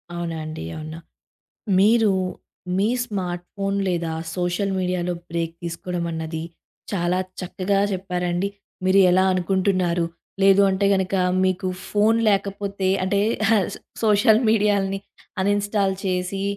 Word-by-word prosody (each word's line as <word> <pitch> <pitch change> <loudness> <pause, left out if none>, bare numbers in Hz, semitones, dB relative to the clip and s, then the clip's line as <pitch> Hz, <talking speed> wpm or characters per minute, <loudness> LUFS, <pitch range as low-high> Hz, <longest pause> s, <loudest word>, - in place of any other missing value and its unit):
అవునా 170 -1 -3
అండి? 155 - -6
అవునా? 155 +1 -7 0.8
మీరు 220 +2 +5 0.7
మీ 200 +2 +2 0.2
స్మార్ట్ 180 -6 -3
ఫోన్ 195 0 -1
లేదా 170 -2 -1 0.2
సోషల్ 180 +2 -1
మీడియాలో 180 -1 -1 0.2
బ్రేక్ 165 -1 -2
తీసుకోవడం 170 +1 -4
అన్నది, 160 0 -4 0.5
చాలా 180 -2 0 0.2
చక్కగా 190 +2 -1
చెప్పారండి. 180 -1 -1 0.4
మీరు 190 +1 +5
ఎలా 185 +1 +4
అనుకుంటున్నారు, 185 -2 +1 0.4
లేదు 195 0 +6
అంటే 190 +1 +1
గనుక 190 0 0 0.3
మీకు 185 0 0 0.2
ఫోను 215 +2 +3
లేకపోతే 200 -1 -1 0.2
అంటే 200 +2 +1 0.3
ఆహ్, 210 -5 +3
స - - -6 0.3
సోషల్ 215 +1 +5
మీడియాలని 200 -3 +2 0.4
అన్‌ఇన్‌స్టాల్ 205 0 +1
చేసి, 185 +1 -1
190 Hz, 115 wpm, -23 LUFS, 175-200 Hz, 0.8 s, లేదు